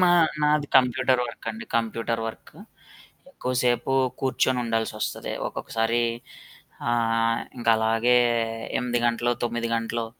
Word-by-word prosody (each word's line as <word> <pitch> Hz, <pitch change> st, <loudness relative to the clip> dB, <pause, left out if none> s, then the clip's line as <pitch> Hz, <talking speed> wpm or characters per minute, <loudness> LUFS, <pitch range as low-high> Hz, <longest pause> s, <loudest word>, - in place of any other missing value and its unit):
మా 180 Hz, -, +5 dB, 0.3 s
నాది 150 Hz, 0 st, +2 dB
computer 130 Hz, 0 st, +3 dB
work 115 Hz, -, -10 dB
అండి 230 Hz, +2 st, -8 dB
కంప్యూటర్ 115 Hz, 0 st, -1 dB
వర్కు. 115 Hz, -, -9 dB, 0.7 s
ఎక్కువసేపు 125 Hz, -, 0 dB, 0.3 s
కూర్చొని 130 Hz, -1 st, +1 dB
ఉండాల్సి 115 Hz, -1 st, -1 dB
వస్తది. -, -, -3 dB
ఒక్కొక్కసారి 115 Hz, +1 st, -1 dB, 0.9 s
ఆహ్, 115 Hz, -1 st, +1 dB, 0.2 s
ఇంకలాగే 115 Hz, +1 st, +3 dB, 0.6 s
8 120 Hz, -1 st, 0 dB
గంటలు, 120 Hz, +1 st, +1 dB
9 120 Hz, 0 st, -1 dB
గంటలు 115 Hz, 0 st, -2 dB
120 Hz, 105 wpm, -25 LUFS, 115-125 Hz, 0.9 s, మా